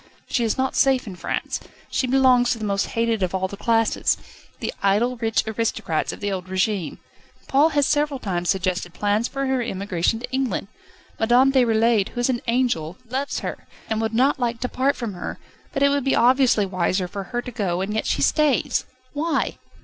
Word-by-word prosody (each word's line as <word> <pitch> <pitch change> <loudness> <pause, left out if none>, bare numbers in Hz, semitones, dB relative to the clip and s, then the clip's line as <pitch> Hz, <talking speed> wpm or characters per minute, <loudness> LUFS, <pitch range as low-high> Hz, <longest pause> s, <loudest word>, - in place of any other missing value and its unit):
She 240 - 0
is 225 - 0
not 265 0 0
safe 265 -1 +3
in 195 -4 -7
France. 175 - -3 0.3
She 260 - 0
belongs 250 -2 +4
to - - +1
the 220 - -4
most 200 -1 0
hated 230 -2 +1
of 185 0 0
all 190 0 0
the 200 - -8
classes 225 +1 +1 0.4
the - - -3
idle, 210 +6 +2
rich 225 -1 0
aristocrats 220 -6 -1
of - - -10
the 205 0 -1
old 185 -1 -4
régime. 190 -1 -1 0.5
Paul 285 +4 +4
has 285 - +4
several 290 -2 +1
times 180 -5 -2
suggested 185 -2 -1
plans 210 +3 +1
for 275 0 -3
her 265 -1 +1
emigration 200 -2 -1
to 250 - -7
England. 260 -1 -1 0.5
Madame 245 +4 +4
Déroulède, 230 -5 +3
who 245 - -7
is 245 +2 +2
an 240 - -2
angel, 230 -9 0
loves 270 +3 -2
her, - - -6 0.2
and 220 0 +1
would 225 0 -1
not 265 +4 +3
like 235 -2 -1
to 250 - 0
part 265 +3 +1
from 230 -5 -4
her, 175 - -6 0.3
but 275 - 0
it 280 - +6
would 285 -1 +1
be 270 - +2
obviously 250 -3 +4
wiser 185 0 0
for 195 +1 -6
her 240 +3 -3
to 250 - -7
go, 190 -6 -1
and 200 +2 -2
yet 220 - -1
she - - +1
stays. 300 -5 +2 0.3
Why?" 320 +3 -1
230 Hz, 200 wpm, -23 LUFS, 200-260 Hz, 0.5 s, it